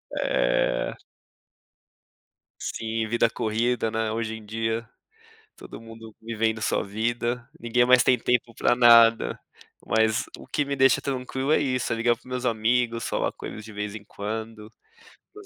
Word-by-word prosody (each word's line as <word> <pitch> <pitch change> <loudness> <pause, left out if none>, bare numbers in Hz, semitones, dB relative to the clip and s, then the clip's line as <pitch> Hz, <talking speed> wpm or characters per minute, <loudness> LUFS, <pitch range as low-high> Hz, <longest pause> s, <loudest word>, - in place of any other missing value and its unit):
É. - - 0 1.6
Sim, 110 0 -3
vida 115 +1 +2
corrida, 115 +1 -1
né? 110 -1 -1
Hoje 110 0 -3
em 110 - -10
dia 115 +1 -3 0.7
todo - - -11
mundo 115 -1 -12
vivendo 110 -1 -1
sua - - 0
vida, 120 +3 -2
ninguém 120 +1 +2
mais 125 0 +6
tem 125 +1 +4
tempo 120 0 0
para - - +2
nada. 115 -1 +6 0.5
Mas 110 0 +2
o - - -13
que 145 - -1
me 140 0 -2
deixa 135 -2 +4
tranquilo 130 +1 -3
é - - +4
isso, 125 -3 -1
é - - -1
ligar 120 +1 +2
para - - -25
os - - -27
meus 125 0 -4
amigos, 115 +1 +1
falar - - -1
coisas 105 - -8
de 110 - -11
vez 105 0 -4
em 105 -1 -8
quando, 110 +1 -6 0.4
para 420 - -17
os 410 - -16
115 Hz, 160 wpm, -25 LUFS, 110-125 Hz, 1.6 s, mais